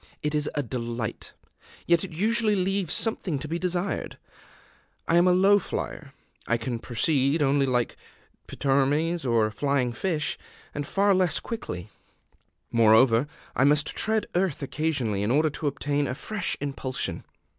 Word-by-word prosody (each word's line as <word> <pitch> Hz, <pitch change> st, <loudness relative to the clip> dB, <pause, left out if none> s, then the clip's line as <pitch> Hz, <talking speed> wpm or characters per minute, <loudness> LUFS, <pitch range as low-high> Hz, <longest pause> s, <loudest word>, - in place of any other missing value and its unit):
It 150 Hz, 0 st, -1 dB
is 150 Hz, -1 st, 0 dB
a 145 Hz, -, 0 dB
delight; 115 Hz, -2 st, -4 dB, 0.5 s
yet 170 Hz, 0 st, +3 dB
it 195 Hz, -, -5 dB
usually 215 Hz, +5 st, +2 dB
leaves 190 Hz, -1 st, -1 dB
something 190 Hz, -8 st, 0 dB
to 140 Hz, -, -6 dB
be 165 Hz, +3 st, -3 dB
desired. 180 Hz, +2 st, -2 dB, 0.9 s
I 165 Hz, -, +2 dB
am 175 Hz, +1 st, +5 dB
a -, -, +5 dB
low 195 Hz, +3 st, +5 dB
flyer; 145 Hz, -6 st, -5 dB, 0.3 s
I 115 Hz, -, +2 dB
can 115 Hz, 0 st, -4 dB
proceed 140 Hz, +5 st, +1 dB
only 140 Hz, 0 st, +2 dB
like 125 Hz, -2 st, 0 dB, 0.5 s
a -, -, -8 dB
pteromys 140 Hz, +2 st, +1 dB
or 115 Hz, -2 st, +3 dB
a 110 Hz, -, -3 dB
flying 135 Hz, 0 st, 0 dB
fish 155 Hz, +2 st, -2 dB, 0.3 s
and 145 Hz, -1 st, -4 dB
far 200 Hz, 0 st, +3 dB
less 185 Hz, -4 st, +2 dB
quickly: 90 Hz, -, -6 dB, 0.8 s
moreover, 115 Hz, +3 st, +5 dB, 0.3 s
I -, -, +3 dB
must 150 Hz, +2 st, +2 dB
tread 220 Hz, 0 st, 0 dB
earth 175 Hz, -5 st, 0 dB
occasionally 135 Hz, -9 st, -1 dB
in 105 Hz, -, 0 dB
order 150 Hz, +4 st, +3 dB
to 150 Hz, -, -3 dB
obtain 145 Hz, 0 st, -1 dB
a 130 Hz, -, -3 dB
fresh 185 Hz, +2 st, -3 dB
impulsion. 135 Hz, -2 st, -3 dB
145 Hz, 155 wpm, -26 LUFS, 130-175 Hz, 0.9 s, am